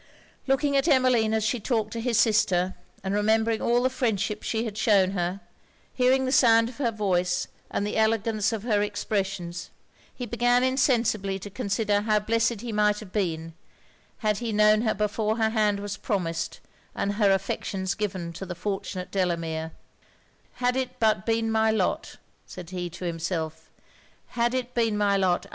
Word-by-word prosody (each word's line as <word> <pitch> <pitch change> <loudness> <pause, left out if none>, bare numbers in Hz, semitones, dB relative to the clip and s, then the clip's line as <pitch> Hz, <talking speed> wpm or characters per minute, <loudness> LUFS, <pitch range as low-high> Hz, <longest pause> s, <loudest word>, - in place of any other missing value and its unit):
Looking 280 +1 +2
at 275 +3 +2
Emmeline 255 -6 +3
as 220 -1 +1
she 230 +3 0
talked 220 -1 -1
to 230 - -3
his 235 -2 0
sister, 190 -5 +2 0.3
and 190 0 -2
remembering 220 +2 +2
all 240 +1 +2
the 255 - +3
friendship 215 -4 -1
she 225 +1 -2
had 215 -3 -5
shewn 200 -4 +3
her, 180 +1 -2 0.5
hearing 260 +1 +3
the 260 - -1
sound 230 -3 +5
of 245 - -12
her 265 -4 +1
voice 180 -5 0 0.2
and 200 - -1
the 210 - -2
elegance 220 -1 +1
of 220 -2 -4
her 215 -4 +1
expressions, 195 -4 -3 0.4
he 245 - -6
began 245 +1 +2
insensibly 235 -7 +1
to 200 +1 -9
consider 205 -2 0
how 215 0 +2
blessed 225 +1 0
he 240 -1 -5
might 210 -1 +2
have 210 -4 -11
been, 165 -5 -2 0.6
had 210 -2 0
he 235 -2 -3
known 215 0 +4
her 225 -2 0
before 210 +2 -1
her 220 -1 +1
hand 210 -2 +1
was 205 0 -5
promised 170 -6 -3 0.3
and 200 - -1
her 205 -1 +3
affections 195 0 -1
given 190 -5 -4
to 175 - -7
the 180 - -5
fortunate 190 -1 -4
Delamere. 165 -4 -1 0.8
'Had 250 0 0
it 255 -1 -3
but 215 -2 +2
been 225 0 +1
my 220 0 +3
lot!' 220 - -1 0.3
said 180 -1 -9
he 180 -1 -4
to 175 +2 -8
himself 160 -2 -3 0.6
'had 240 +1 0
it 250 -1 -3
been 225 -3 +1
my 205 -1 +2
lot! 185 -2 +1
210 Hz, 170 wpm, -26 LUFS, 195-230 Hz, 0.8 s, sound